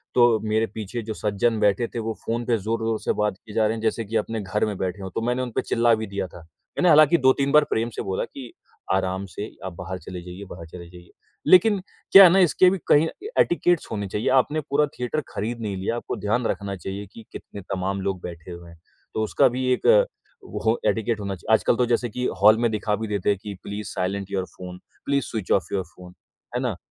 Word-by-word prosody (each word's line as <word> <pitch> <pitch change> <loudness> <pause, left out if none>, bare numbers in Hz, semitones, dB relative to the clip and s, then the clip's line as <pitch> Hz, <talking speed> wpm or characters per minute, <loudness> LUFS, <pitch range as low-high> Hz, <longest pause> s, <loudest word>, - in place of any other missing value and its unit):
तो 120 -3 +5
मेरे 110 +1 +1
पीछे 110 +2 -4
जो 110 - -2
सज्जन 110 +2 0
बैठे 105 +4 +2
थे, 120 - -6
वो 115 0 -3
फ़ोन 120 +1 -2
पे 120 -2 +2
ज़ोर 110 +3 -2
ज़ोर 115 -1 0
से - - 0
बात 105 -2 -1
किए 105 +2 -13
जा 110 - +3
रहे 110 - -1
हैं 110 - -6
जैसे 115 0 -1
कि 110 +3 -6
अपने 110 +1 -2
घर 100 +2 -1
में 105 -2 -3
बैठे 95 +1 -3
हों, 95 - -5
तो - - -1
मैंने 125 +2 0
उनपे 125 -3 -2
चिल्ला 115 0 +2
भी 110 0 -5
दिया 100 -1 -3
था। 90 - -13 0.4
मैंने 180 - +4
हालाँकि 155 +1 +7
2-3 135 +1 +3
बार 150 0 +6
प्रेम 115 +1 0
से - - -3
बोला 95 -1 -2
कि, 130 -4 -10 0.4
"आराम 95 0 -1
से, 105 - -4 0.2
आप 95 - -5
बाहर 90 +1 -6
चले 90 -1 -8
जाइए, 90 +3 -9
बाहर 85 -1 -9
चले 85 +1 -11
जाइए।" 85 0 -15 0.4
लेकिन 195 +2 +6 0.3
क्या 195 0 +11
है 180 - +9
ना 190 - +4
,इसके 185 +3 +5
भी 195 - 0
कहीं 150 +2 +5 0.2
ए 435 - -5
एटिकेट्स 175 -1 +1
होने 100 -2 -3
चाहिए, 105 +4 -3
आपने 135 +4 +2
पूरा 145 +2 +3
थिएटर 125 +5 -1
खरीद 115 +3 -4
नहीं 100 -3 -3
लिया, 95 +5 -2
आपको - - -4
ध्यान 115 +3 +1
रखना 100 0 -3
चाहिए 95 +2 -6
कि 115 - -12
कितने 100 - -9
तमाम 95 +1 -2
लोग 95 -2 -2
बैठे 85 0 -8
हुए 85 0 -10
हैं। 85 -1 -16 0.3
तो 110 - -1
उसका - - +3
भी 130 - -1
एक - - -4 0.8
हो 110 +2 +2
एटिकेट 110 0 -1
होना 100 -1 -3
चाहिए। 105 +5 -1
आजकल 110 - +3
तो 125 - +3
जैसे 120 0 0
कि 125 +4 -3 0.2
हॉल 105 +2 +7
में - - +3
दिखा 105 -1 -1
भी 110 +2 -4
देते 100 -2 -1
हैं 100 - +2
कि 105 - -5
please 105 0 -6
silent 95 +1 -3
your 95 -1 -1
phone, 90 0 -8 0.3
please 140 -2 +1
switch 110 -5 -5
off 90 -3 +1
your 95 - 0
phone, 90 -1 -13 0.4
है - - 0
ना, - - -1
110 Hz, 240 wpm, -24 LUFS, 95-120 Hz, 0.8 s, क्या